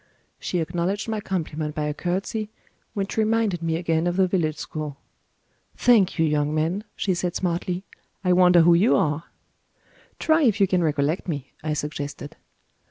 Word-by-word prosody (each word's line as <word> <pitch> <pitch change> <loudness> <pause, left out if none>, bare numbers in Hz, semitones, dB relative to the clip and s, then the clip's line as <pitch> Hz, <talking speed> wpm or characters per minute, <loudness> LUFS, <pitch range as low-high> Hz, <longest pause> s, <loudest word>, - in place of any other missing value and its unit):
She 180 - -2
acknowledged 175 +6 -2
my 220 -1 -2
compliment 155 -5 -3
by 150 - -1
a 150 0 -1
curtsey, 195 +6 -2 0.5
which 195 +1 -3
reminded 220 -4 +1
me 165 -1 0
again 165 0 0
of 175 - 0
the 190 -1 +4
village 160 -5 0
school. 150 -3 -5 0.8
"Thank 220 -7 +4
you, 165 - +3
young 150 0 +1
man," 170 +7 -1
she 190 - 0
said 175 0 -2
smartly; 180 +1 -2 0.4
"I 180 -1 +3
wonder 180 -1 +6
who 170 +1 +6
you 190 +8 +4
are?" 150 +2 0 0.9
"Try 320 +1 +3
if 225 -7 +3
you 200 - +6
can 185 -1 +1
recollect 150 +3 0
me," 145 -6 -4
I 155 -1 -1
suggested. 145 -1 -5
175 Hz, 165 wpm, -24 LUFS, 155-195 Hz, 0.9 s, wonder